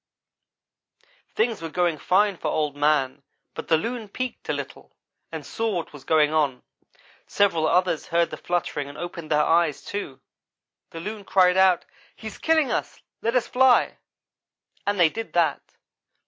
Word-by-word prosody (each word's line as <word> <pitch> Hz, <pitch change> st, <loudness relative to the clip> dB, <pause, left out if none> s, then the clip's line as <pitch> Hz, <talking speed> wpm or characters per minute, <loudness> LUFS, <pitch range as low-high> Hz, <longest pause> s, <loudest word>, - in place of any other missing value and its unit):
things 225 Hz, -2 st, 0 dB
were 165 Hz, -, -5 dB
going 175 Hz, 0 st, +1 dB
fine 195 Hz, +6 st, +2 dB
for -, -, -5 dB
Old 150 Hz, -2 st, -1 dB
man, 145 Hz, -2 st, +1 dB, 0.3 s
but -, -, -7 dB
the 160 Hz, -, +4 dB
loon 230 Hz, +3 st, -4 dB
peeked 255 Hz, +4 st, -5 dB
a -, -, +2 dB
little, -, -, -7 dB, 0.4 s
and -, -, -6 dB
saw 225 Hz, -3 st, -2 dB
what 170 Hz, -3 st, -4 dB
was 145 Hz, -2 st, -11 dB
going 155 Hz, -1 st, +3 dB
on; 145 Hz, -5 st, 0 dB, 0.6 s
several 170 Hz, -6 st, +2 dB
others 180 Hz, -3 st, +1 dB
heard 170 Hz, 0 st, +1 dB
the -, -, -4 dB
fluttering 165 Hz, -5 st, -2 dB
and 145 Hz, -, -11 dB
opened 170 Hz, -1 st, -7 dB
their 150 Hz, 0 st, +3 dB
eyes, 160 Hz, -4 st, +2 dB
too. 145 Hz, -10 st, -5 dB, 0.7 s
The 165 Hz, -, -8 dB
loon 210 Hz, +3 st, -6 dB
cried 180 Hz, -2 st, +4 dB
out, 190 Hz, -2 st, +4 dB, 0.3 s
'He's 220 Hz, -2 st, -9 dB
killing 320 Hz, -3 st, +2 dB
us -, -, -3 dB, 0.2 s
let 230 Hz, +2 st, -1 dB
us 250 Hz, -, +2 dB
fly,' 255 Hz, 0 st, +3 dB, 0.9 s
and 205 Hz, -1 st, 0 dB
they 170 Hz, -2 st, +6 dB
did 225 Hz, +7 st, -7 dB
that. 165 Hz, -4 st, +2 dB
175 Hz, 160 wpm, -24 LUFS, 155-210 Hz, 0.9 s, they